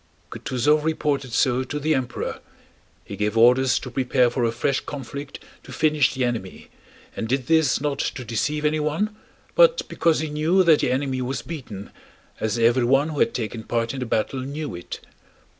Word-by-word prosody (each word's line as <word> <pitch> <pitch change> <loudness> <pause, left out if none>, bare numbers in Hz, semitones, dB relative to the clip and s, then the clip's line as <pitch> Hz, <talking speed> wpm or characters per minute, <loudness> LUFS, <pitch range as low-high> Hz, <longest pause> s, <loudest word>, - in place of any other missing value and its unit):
Kutúzov 150 +4 +1
reported 145 -4 -1
so 125 +2 +2
to 145 +3 -4
the 155 +2 +1
Emperor. 130 -3 -3 0.7
He 100 - -7
gave 105 +2 -1
orders 125 +1 +5
to 125 - -6
prepare 125 -1 +2
for 120 0 -1
a 115 - +2
fresh 130 +4 0
conflict 140 0 -7 0.2
to - - -13
finish 150 -4 +2
the 130 -1 +1
enemy 115 -6 -5 0.5
and 115 - -3
did 130 +1 -1
this 160 -2 +3
not 140 -1 -2
to 125 - -3
deceive 150 +7 -1
anyone, 155 +8 0 0.4
but - - +4
because 165 -3 +1
he 155 0 -3
knew 160 +5 +3
that 165 -4 +5
the - - +1
enemy 130 0 -1
was 130 +2 -3
beaten, 120 - -8 0.5
as 110 +2 -1
everyone 125 +5 +3
who 150 -3 -4
had - - +2
taken 115 -1 -4
part 115 +1 -1
in 135 - -5
the 125 - -3
battle 115 +4 -1
knew 145 +2 -5
it. 85 0 -8
130 Hz, 175 wpm, -23 LUFS, 120-150 Hz, 0.7 s, orders